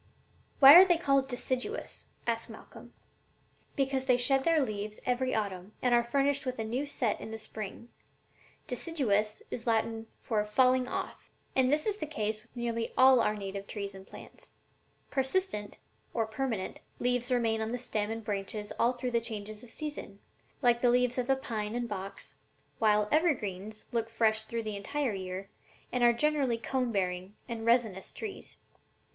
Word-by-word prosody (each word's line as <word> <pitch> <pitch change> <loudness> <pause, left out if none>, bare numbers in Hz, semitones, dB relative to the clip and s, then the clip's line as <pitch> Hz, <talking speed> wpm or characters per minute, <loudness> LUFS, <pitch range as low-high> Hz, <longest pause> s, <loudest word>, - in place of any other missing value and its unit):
"And - - -32
why 275 +1 +12
are 355 +3 +12
they 355 -3 +3
called 275 -5 +2
deciduous?" 260 - -3 0.2
asked - - 0
Malcolm. - - -12 0.8
"Because 270 -1 0
they 250 -2 +5
shed 265 +2 +3
their 330 +1 +4
leaves 215 -5 -3
every 255 +1 0
autumn 200 -2 -3
and 250 -1 +2
are 240 - +6
furnished 275 +4 +1
with 255 -1 -3
a 225 - -2
new 250 +6 -2
set 245 -6 -1
in - - -6
the 220 - -5
spring: 215 +1 -7 0.8
'deciduous' 230 -7 -1
is 240 0 -5
Latin 225 0 0 0.2
for 215 -3 +1
'falling 255 +4 +3
off.' - - -5 0.3
And 260 0 +3
this 300 +1 +2
is 420 -1 0
the 310 - -4
case 215 -6 -2
with 230 +3 -26
nearly 235 -1 -2
all 260 -1 +7
our 215 - +2
native 200 -1 -6
trees 200 -2 -4
and 190 0 -12
plants. - - -12 0.6
Persistent, 265 - -1 0.4
or 225 -2 +2
permanent, 220 -3 -3 0.2
leaves 245 0 0
remain 225 -3 +2
on 220 +1 -2
the 245 - -1
stem 215 -4 -2
and 225 0 -4
branches 205 0 -3
all 240 +2 +4
through 250 0 -3
the 235 -1 +2
changes 215 -1 -5
of 245 - -12
season, 295 -7 -5 0.5
like 240 -1 +4
the 245 - +4
leaves 250 +1 +2
of 250 - -1
the 270 - +4
pine 220 -4 -3
and 240 0 -1
box, 195 -2 -6 0.5
while 210 -1 +3
evergreens 215 - 0
look 230 -1 -1
fresh 220 -1 +2
through 230 +1 -3
the 215 -1 -3
entire 250 +5 -1
year 190 0 -5 0.4
and 250 -1 0
are 240 - +7
generally 275 -1 +1
cone 250 +1 -1
bearing 185 -1 -2
and 230 -2 -5
resinous 225 -6 +2
trees. 425 -3 -7
235 Hz, 175 wpm, -30 LUFS, 215-260 Hz, 0.8 s, why